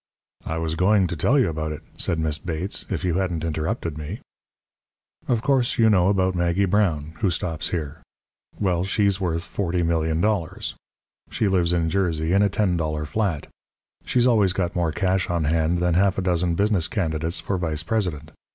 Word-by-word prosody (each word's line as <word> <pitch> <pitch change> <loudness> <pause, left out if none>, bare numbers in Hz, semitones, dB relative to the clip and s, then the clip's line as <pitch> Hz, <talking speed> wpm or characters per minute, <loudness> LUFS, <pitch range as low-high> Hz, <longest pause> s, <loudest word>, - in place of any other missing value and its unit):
"I 80 - -2
was 80 -1 -2
going 95 +3 +3
to 85 - -3
tell 125 - +2
you 130 - +4
all - - -1
about 80 0 -3
it," 75 - -7
said 85 - 0
Miss 80 -1 -1
Bates, 85 +3 -3
"if - - -2
you 90 +1 +1
hadn't 90 -4 -2
interrupted 80 - -2
me. 80 +9 -6 1.1
"Of 120 -2 +1
course, 130 -3 +2
you 110 -1 +5
know 90 -3 +4
about 95 -2 +2
Maggie 85 +2 +1
Brown, 85 -6 0
who 100 - +2
stops 80 -2 -2
here. 80 -2 -4 0.6
Well, 90 -4 +1
she's 100 0 +1
worth 85 -2 -1
$40,000,000. 85 0 -1 0.6
She 110 - 0
lives 90 -3 +2
in 85 -2 +1
Jersey 85 -3 0
in 100 - +4
a 100 - +3
ten 95 -3 +1
dollar 75 -2 -2
flat. 90 -3 -1 0.6
She's 125 -1 +2
always 105 -7 +3
got 90 -2 -2
more 85 -2 +1
cash 95 +2 0
on 85 -2 0
hand 80 +2 +1
than 90 0 +1
half 95 +2 +2
a 95 - -1
dozen 90 -1 +1
business 100 -3 +1
candidates 80 -2 -1
for 95 -2 -2
vice 80 -3 -2
president. 85 -6 -2
90 Hz, 180 wpm, -23 LUFS, 80-100 Hz, 1.1 s, you